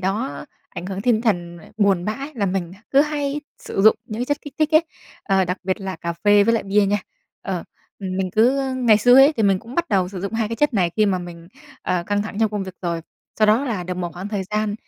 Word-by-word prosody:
đó 205 Hz, +8 st, -2 dB, 0.2 s
ảnh 180 Hz, -, -7 dB
hưởng 195 Hz, 0 st, -4 dB
tinh 225 Hz, 0 st, +2 dB
thần 175 Hz, -7 st, -1 dB
mà 170 Hz, -, -14 dB
buồn 195 Hz, -4 st, +2 dB
bã 245 Hz, +6 st, -3 dB
là 205 Hz, -5 st, 0 dB
mình 180 Hz, -2 st, -2 dB
h -, -, -13 dB
cứ 275 Hz, -, +5 dB
hay 295 Hz, -1 st, -1 dB, 0.2 s
sử 195 Hz, -, -3 dB
dụng 220 Hz, -, +7 dB
những 215 Hz, 0 st, -6 dB
cái -, -, 0 dB
chất 290 Hz, +2 st, -1 dB
kích 290 Hz, -, -10 dB
thích 310 Hz, 0 st, +2 dB
ấy, 315 Hz, +2 st, +6 dB, 0.4 s
ờ, 190 Hz, -2 st, +2 dB
đặc 180 Hz, +1 st, -2 dB
biệt 190 Hz, +2 st, -1 dB
là 190 Hz, -2 st, -4 dB
cà 170 Hz, +1 st, -4 dB
phê 205 Hz, +4 st, +4 dB
với 230 Hz, +2 st, +3 dB
lại 225 Hz, -, 0 dB
bia 200 Hz, +1 st, +2 dB
nha. 205 Hz, +1 st, +1 dB, 0.4 s
Ờ, 185 Hz, -3 st, -3 dB, 0.3 s
ừm, 185 Hz, -2 st, -4 dB
mình 190 Hz, -1 st, -1 dB
cứ 260 Hz, +6 st, +2 dB
ngày 230 Hz, -4 st, +4 dB
xưa 245 Hz, +3 st, +5 dB
ấy 275 Hz, +3 st, +8 dB
thì 225 Hz, -, +1 dB
mình 195 Hz, -2 st, +3 dB
cũng 230 Hz, +6 st, -11 dB
bắt 345 Hz, +2 st, 0 dB
đầu 185 Hz, -2 st, +1 dB
sử 185 Hz, -1 st, -7 dB
dụng 200 Hz, +4 st, -4 dB
2 225 Hz, -1 st, -1 dB
cái 230 Hz, -, -4 dB
chất 295 Hz, 0 st, +1 dB
này 180 Hz, -4 st, +2 dB
khi 215 Hz, -1 st, +4 dB
mà 190 Hz, -2 st, +1 dB
mình, 170 Hz, -1 st, -9 dB, 0.3 s
ờ, 180 Hz, -1 st, 0 dB
căng 205 Hz, 0 st, 0 dB
thẳng 210 Hz, -1 st, -7 dB
trong 220 Hz, -, +4 dB
công 205 Hz, -2 st, -3 dB
việc 190 Hz, -, -8 dB
rồi, 170 Hz, -1 st, -2 dB, 0.4 s
sau 215 Hz, -, +5 dB
đó 220 Hz, +6 st, +3 dB
là 215 Hz, -9 st, -2 dB
được 180 Hz, 0 st, -4 dB
một 175 Hz, -2 st, -4 dB
khoảng 185 Hz, +4 st, -6 dB
thời 205 Hz, -2 st, -2 dB
gian 210 Hz, -1 st, 0 dB
205 Hz, 270 wpm, -21 LUFS, 185-230 Hz, 0.4 s, ấy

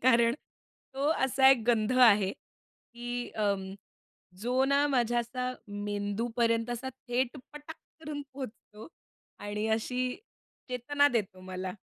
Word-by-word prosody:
कारण 235 Hz, -1 st, +5 dB, 0.6 s
तो 275 Hz, +2 st, 0 dB, 0.2 s
असा 265 Hz, 0 st, +5 dB
एक 255 Hz, -4 st, +4 dB
गंध 230 Hz, 0 st, +2 dB
आहे, 205 Hz, -5 st, +6 dB, 0.6 s
की 240 Hz, 0 st, -4 dB
अं, 200 Hz, -3 st, -1 dB, 0.7 s
जो 250 Hz, +3 st, +2 dB
ना 280 Hz, +1 st, +3 dB
माझ्या 240 Hz, -3 st, +2 dB
असा 250 Hz, +2 st, -3 dB, 0.2 s
मेंदूपर्यंत 225 Hz, +3 st, -1 dB
असा 240 Hz, +2 st, -3 dB, 0.2 s
थेट 245 Hz, +2 st, 0 dB, 0.2 s
पटाक 295 Hz, +2 st, -9 dB, 0.2 s
करून 300 Hz, -2 st, -5 dB
पोहोचतो 225 Hz, -4 st, -9 dB, 0.5 s
आणि 205 Hz, +1 st, -3 dB
अशी 250 Hz, +3 st, -1 dB, 0.5 s
चेतना 285 Hz, +4 st, +2 dB
देतो 210 Hz, -7 st, -2 dB
मला. 185 Hz, 0 st, -5 dB
240 Hz, 115 wpm, -30 LUFS, 210-260 Hz, 0.7 s, आहे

